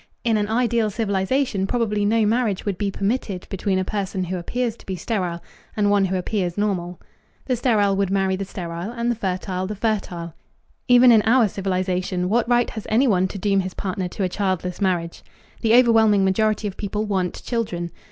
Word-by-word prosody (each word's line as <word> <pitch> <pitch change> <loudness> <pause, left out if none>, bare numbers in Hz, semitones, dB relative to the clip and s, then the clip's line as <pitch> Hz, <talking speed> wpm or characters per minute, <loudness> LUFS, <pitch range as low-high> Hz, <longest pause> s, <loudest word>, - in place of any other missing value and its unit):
In 230 -2 +2
an 210 0 0
ideal 235 -1 +1
civilization 200 +1 0
probably 210 -3 0
no 220 +1 +3
marriage 220 -3 0
would 200 -4 -2
be 205 - 0
permitted 195 -2 -2
between 195 0 -1
a 185 - 0
person 195 -2 -2
who 180 +1 -3
appears 235 +6 -2
to - - -17
be 190 - -3
sterile 180 -3 -3 0.3
and 205 -1 +2
one 200 -1 +3
who 190 0 -1
appears 180 -1 -2
normal. 180 -4 -2 0.5
The 255 - 0
sterile 215 -5 +2
would 195 -1 0
marry 190 -1 +1
the 195 - -3
sterile, 175 -1 -6
and 235 0 -1
the - - -1
fertile 185 -2 -3
the 210 - -4
fertile. 195 -6 -2 0.5
Even 245 0 +7
in 220 -2 +6
our 230 +1 +4
civilization 185 -1 -1
what 235 +2 +1
right 240 0 +2
has 220 - -7
anyone 215 -6 +3
to 195 - -7
doom 195 0 +1
his 185 -1 -3
partner 185 -1 -3
to 195 +3 -4
a - - +2
childless 185 -1 -2
marriage? 175 -3 -1 0.4
The 225 0 +4
overwhelming 225 -5 +5
majority 215 +2 +1
of 195 - -7
people 210 +1 -2
want 190 -4 -2
children. 180 -8 -3
200 Hz, 190 wpm, -22 LUFS, 185-225 Hz, 0.5 s, Even